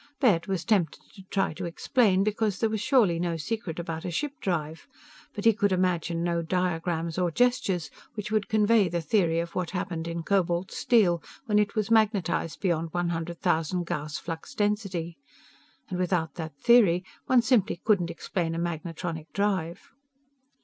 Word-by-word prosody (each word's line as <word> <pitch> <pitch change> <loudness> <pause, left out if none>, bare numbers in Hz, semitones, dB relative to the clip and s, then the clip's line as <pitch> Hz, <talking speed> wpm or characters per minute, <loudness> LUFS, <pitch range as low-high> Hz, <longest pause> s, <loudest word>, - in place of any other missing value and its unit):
Baird 195 - +3
was 190 -3 -2
tempted 195 -9 +1
to 195 - -12
try 195 -5 0
to 175 +3 -5
explain, 190 +3 +2
because 215 -1 0
there 225 -1 0
was 220 -2 -2
surely 215 - +3
no 170 -1 -1
secret 170 +2 -4
about 165 -2 -4
a - - -3
ship 280 - -2
drive, 160 - -3 0.5
but 205 - -5
he 225 - +7
could 205 -2 +1
imagine 175 -2 0
no 170 -1 0
diagrams 170 -1 -1
or 180 -1 +2
gestures 200 -4 +1 0.2
which 215 -1 -5
would 215 0 0
convey 215 -3 +4
the 170 +1 -1
theory 165 0 +1
of 170 0 -4
what 180 -2 -2
happened 180 -3 -3
in 170 0 -4
cobalt 180 -1 0
steel 185 -8 +3 0.2
when 210 -3 +3
it 205 -1 0
was 215 0 -1
magnetized 205 -7 +2
beyond 165 -4 0
one 175 -1 0
hundred 170 0 -4
thousand 175 0 +1
Gauss' 150 -3 -3
flux 165 -1 -7
density. 195 -6 -1 0.7
And 180 - -4
without 175 -4 0
that 160 -4 -7
theory 200 -5 +5 0.2
one 255 -2 +5
simply 225 -8 +2
couldn't 190 -6 +2
explain 165 -3 -3
a - - -2
magnetronic 165 -1 -4
drive. 190 -5 -1
180 Hz, 170 wpm, -27 LUFS, 165-210 Hz, 0.7 s, he